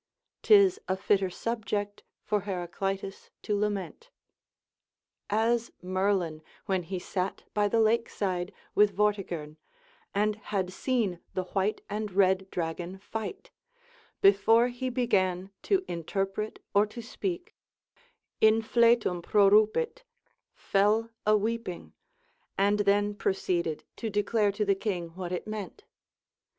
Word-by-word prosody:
'tis 400 -2 +6
a 190 - 0
fitter 195 0 +2
subject 205 0 -3 0.2
for 210 - +1
Heraclitus 195 +1 -4
to 210 - 0
lament. 205 - -3 1.2
As 225 +2 +1
Merlin 185 -4 0 0.2
when 190 -2 0
he 185 +2 -5
sat 185 +1 -3
by 210 0 +2
the 225 +3 +1
lake 225 +1 +3
side 185 -2 -2 0.2
with 205 -2 +4
Vortigern, 180 -7 -1 0.6
and 210 +1 +1
had 190 -3 -3
seen 220 -8 0 0.2
the 185 - 0
white 195 +3 -1
and 210 0 -3
red 190 0 +3
dragon 175 +2 -4
fight, 225 - -6 0.7
before 225 +5 +5
he 250 +1 -3
began 195 -7 0
to 385 -2 +1
interpret 195 +5 -3 0.2
or 205 +1 +4
to 235 +3 -9
speak, 355 - -4 0.9
in 220 +1 +5
fletum 230 -6 +3
prorupit, 215 - +3 0.5
fell 215 +3 +1 0.2
a 215 0 +6
weeping, 220 -4 -3 0.6
and 205 +1 +3
then 205 +1 +2
proceeded 175 -5 -1
to 225 - -3
declare 210 0 +1
to 210 +1 -1
the 200 - +4
king 190 -4 -3
what 180 +1 -6
it 180 - -3
meant. 215 - -6
205 Hz, 120 wpm, -29 LUFS, 190-220 Hz, 1.2 s, tis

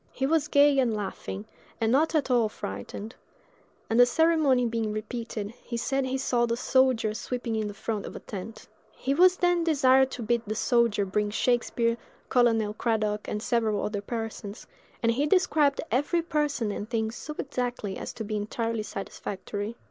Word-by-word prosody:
He 265 - -2
was 305 +1 +2
gay 285 -1 +5
and 240 -4 +2
laughing, 200 0 -5 0.3
and 225 0 +1
not 310 +5 +3
at 285 -4 +1
all 235 -3 +3
frightened; 150 - -6 0.7
and 225 +2 +1
the 245 - +8
ceremony 300 -3 +3
being 225 -2 -1
repeated, 215 -1 -5
he 235 - -4
said 270 +3 0
he 260 +1 -1
saw 245 -2 +1
the 235 0 -1
soldier 255 -4 +2
sweeping 240 0 -3
in 215 -1 -1
the 205 - -7
front 210 -1 -3
of - - -9
a - - -5
tent. 215 +2 -8 0.3
He 275 - -1
was 365 +4 +5
then 350 -1 +2
desired 265 -4 +4
to 250 - -6
bid 235 +1 +1
the 215 - -2
soldier 230 -3 +2
bring 205 +2 0
Shakspere, 235 +1 +1 0.3
Colonel 225 -4 +3
Cradock, 215 -2 -1
and 210 +1 -3
several 225 -3 +1
other 205 -1 -2
persons; 225 -1 -5 0.4
and 230 - +4
he 280 +6 +1
described 305 -5 +3
every 295 +6 +1
person 295 -9 0
and 205 +1 -5
thing 220 -2 -1
so 300 +6 -7
exactly 245 -7 -3
as - - -5
to 225 - -5
be 215 0 -3
entirely 225 +2 -2
satisfactory. 205 +1 -5
235 Hz, 175 wpm, -27 LUFS, 215-265 Hz, 0.7 s, the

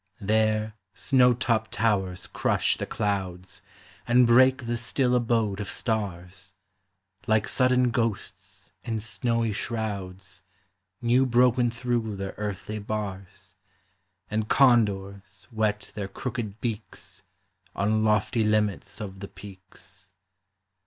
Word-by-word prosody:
There 110 +1 +1 0.2
snow 125 -2 +4
topped 115 -3 -1
towers 95 -5 0
crush - - +1
the - - -5
clouds, 95 -3 -3 0.5
And 125 +1 +5
break 130 +2 +5
the 120 +1 -1
still 125 +2 0
abode 115 -4 +1
of 100 - -4
stars, 95 -4 -4 0.7
Like 110 -1 +2
sudden 125 -1 +2
ghosts 100 -4 -4
in 115 -2 -2
snowy 110 +1 -1
shrouds, 95 -5 -5 0.6
New 125 +3 +3
broken 125 0 +3
through 120 -2 -2
their 95 0 -5
earthly 105 +1 -4
bars, 100 -3 -6 0.7
And 110 +1 -2
condors 100 -6 +2
whet 105 -2 -1
their 100 -2 -4
crooked 110 0 -5
beaks 115 -3 -6 0.5
On 110 +3 +1
lofty 110 +2 +2
limits 105 -1 0
of 95 -2 -7
the 100 - -7
peaks. 95 -1 -13
110 Hz, 110 wpm, -26 LUFS, 100-120 Hz, 0.7 s, And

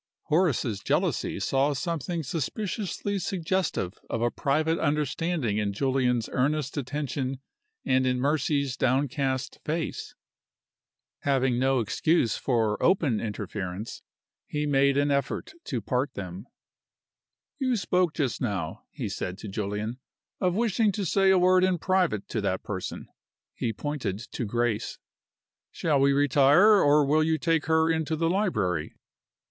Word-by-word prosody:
Horace's 150 - +1
jealousy 100 - 0
saw 135 +8 +1
something 165 +2 -3
suspiciously 200 - -3
suggestive 175 - -2
of 115 - -1
a 120 - +2
private 155 +4 0
understanding 150 -5 0
in 100 -1 -1
Julian's 125 -1 +1
earnest 140 +1 0
attention 135 -1 -3 0.5
and 130 0 +2
in 125 0 +1
Mercy's 140 -1 0
downcast 130 0 0
face. 160 +1 -3 1.0
Having 130 -3 +1
no 135 0 +2
excuse 115 +3 +1
for 115 -5 0
open 155 - +3
interference, 105 -1 -5 0.5
he 150 0 -2
made 140 -1 +3
an 145 0 +2
effort 140 0 -1
to 125 -4 -2
part 125 +5 -1
them. 95 +3 -7 1.1
"You 255 -3 +1
spoke 180 -4 +1
just 140 -6 -1
now," 95 -10 -3
he - - -5
said 90 +1 -4
to 110 - -8
Julian, 105 +4 -3 0.4
"of 180 -1 +1
wishing 220 -1 +2
to 205 -1 -2
say 195 +3 +3
a 190 - +6
word 185 0 +4
in 185 -1 +2
private 180 - +1
to - - -2
that - - -1
person." - - -5 0.5
(He 115 - -2
pointed 120 -5 -3
to 120 +2 -5
Grace.) 120 0 -1 0.7
"Shall 150 -4 0
we 140 +1 +4
retire, 145 +9 +5
or 145 0 +5
will 150 +3 +3
you 160 0 +1
take 165 -2 0
her 160 0 +3
into 160 -1 0
the 165 +1 +1
library?" 100 - 0
140 Hz, 135 wpm, -27 LUFS, 120-165 Hz, 1.1 s, a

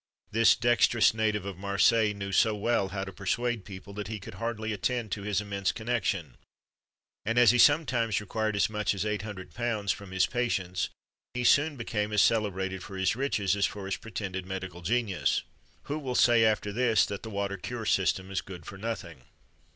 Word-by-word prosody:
This 115 +1 +5
dexterous 120 -2 +4
native 110 -3 0
of 100 -3 -6
Marseilles 100 +2 +3
knew 100 -1 -5
so 110 +3 +3
well 105 -1 +1
how 95 0 -4
to 95 0 -7
persuade 115 +4 -1
people, 100 0 -10
that 105 -1 -5
he 110 0 -5
could 105 +3 -10
hardly 110 -1 -2
attend 115 +2 -2
to 100 - -2
his 100 0 0
immense 100 -2 -1
connection; 110 - -2 0.9
and 115 +3 -1
as 120 -3 +7
he 125 - +1
sometimes 125 -7 +4
required 110 +1 -2
as 100 - +3
much 105 -1 -1
as 95 - -2
£800 105 0 -2
from 100 +2 -11
his 95 0 +2
patients,[XXV 95 -8 -1 0.5
43] - - -2
he - - 0
soon 145 +5 +4
became 105 -3 -2
as 105 -1 +4
celebrated 95 -4 0
for 95 +1 -8
his 95 +2 +1
riches 105 -8 0
as 100 -1 +2
for 100 -2 -7
his 95 -1 -2
pretended 95 -4 -5
medical 95 -2 -6
genius. 105 0 0 0.4
Who 150 +2 -3
will 130 -4 -4
say, 120 -2 +5
after 105 -1 +1
this, 120 -1 +3
that 100 -1 -5
the 110 - -7
water 100 -1 -2
cure 115 +4 -5
system 95 -1 +1
is 95 - -1
good 90 -4 -10
for 95 +2 -9
nothing? 110 - -5
105 Hz, 190 wpm, -29 LUFS, 95-115 Hz, 0.9 s, as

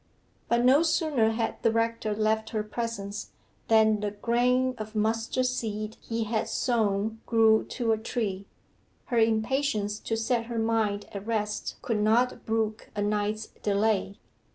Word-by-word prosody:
But 235 +1 +3
no 270 +4 +6
sooner 310 -8 +2
had 225 0 -2
the 230 - +3
rector 230 -1 0
left 220 +1 0
her 215 -1 -2
presence, 210 -2 -5 0.3
than 220 -1 +4
the 210 0 -1
grain 245 +4 +1
of 215 0 -7
mustard 225 +4 0
seed 220 -4 -3
he 230 0 -2
had 220 0 -1
sown 220 -2 0
grew 225 -1 +4
to 235 -3 -1
a 220 - +1
tree. 205 -4 -3 0.7
Her 235 - +4
impatience 220 -1 +1
to 225 - -2
set 230 +1 0
her 235 0 -5
mind 220 -2 0
at 200 +1 -6
rest 210 -2 -2
could 220 -3 0
not 235 +5 +2
brook 220 -1 -1
a 205 - 0
night's 210 +1 -1 0.2
delay. 200 -1 +1
220 Hz, 150 wpm, -27 LUFS, 210-230 Hz, 0.7 s, no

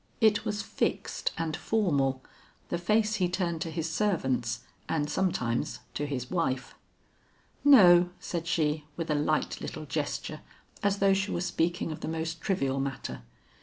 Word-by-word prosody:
It 215 -1 +4
was 210 -1 -2
fixed - - -1
and 160 -2 -1
formal, 140 -12 +1 0.5
the 175 - -1
face 215 +4 +2
he 180 -3 +1
turned 175 -3 -1
to 165 - -2
his 160 0 -2
servants 130 - 0 0.3
and 150 -2 0
sometimes 145 -8 -1
to 145 - -2
his 125 -3 -4
wife. 135 -8 -1 0.9
"No," 180 -11 +8
said 170 -1 -4
she, 155 -3 +1
with 165 -2 -2
a - - +4
light 150 +1 0
little 155 - -5
gesture 150 +2 -3 0.4
as 200 0 +2
though 195 -1 +4
she 195 +1 0
were - - -1
speaking 175 -1 0
of 155 - -6
the - - -5
most 160 0 -3
trivial 135 -8 0
matter. 135 - -4
165 Hz, 155 wpm, -29 LUFS, 145-190 Hz, 0.9 s, No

